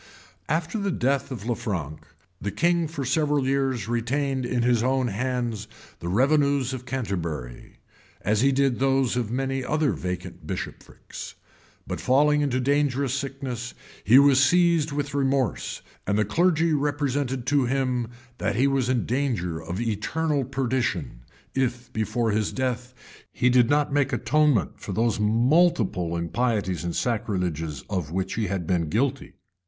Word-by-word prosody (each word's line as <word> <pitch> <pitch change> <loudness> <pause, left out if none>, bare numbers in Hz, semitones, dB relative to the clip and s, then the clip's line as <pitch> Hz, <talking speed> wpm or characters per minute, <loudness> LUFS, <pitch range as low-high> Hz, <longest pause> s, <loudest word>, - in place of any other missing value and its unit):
After 165 +7 -1
the 200 0 -1
death 140 -5 0
of 115 -6 -6
Lanfranc, 100 - -3 0.4
the 100 - -2
king 170 - +1
for 150 -3 -5
several 145 0 +1
years 135 -5 0
retained 130 +3 -1
in 120 -1 0
his 120 -2 +3
own 130 0 +1
hands 120 -1 -2 0.3
the 85 - -6
revenues 140 - +2
of 130 -1 -7
Canterbury, 85 - -4 0.4
as 105 +4 +1
he 135 +1 +4
did 135 -2 +1
those 135 -2 +2
of 120 -4 -1
many 135 +2 -1
other 150 +2 +1
vacant 90 0 -5
bishoprics: - - -7 0.5
but - - -4
falling 150 +3 +3
into 140 -3 +1
a - - 0
dangerous 140 -1 +1
sickness, 135 -4 -4 0.3
he 120 +6 +6
was 140 -1 +6
seized 170 0 +3
with 145 0 -3
remorse; 135 -3 0 0.2
and 100 +1 +1
the 110 - +2
clergy 165 - +2
represented 140 -3 -1
to 140 -1 +2
him, 125 -2 0 0.3
that - - 0
he 125 +5 +3
was 135 -3 +1
in 125 -3 +1
danger 110 - -1
of 85 +4 -5
eternal 135 +7 -1
perdition, 130 - -2 0.3
if 125 -2 -2
before 110 +1 0
his 105 0 0
death 125 -1 -3 0.4
he 125 0 +2
did 125 -1 +4
not 145 -1 +2
make 145 -2 +2
atonement 150 -8 +2
for - - -6
those 115 0 +1
multiplied 110 - +2
impieties 100 -2 -1
and 85 -1 -3
sacrileges 90 - -2
of 90 -7 -2
which 95 +3 -2
he 110 -2 -1
had 90 -2 -2
been 85 -2 0
guilty. 135 - -1
125 Hz, 150 wpm, -25 LUFS, 110-140 Hz, 0.5 s, he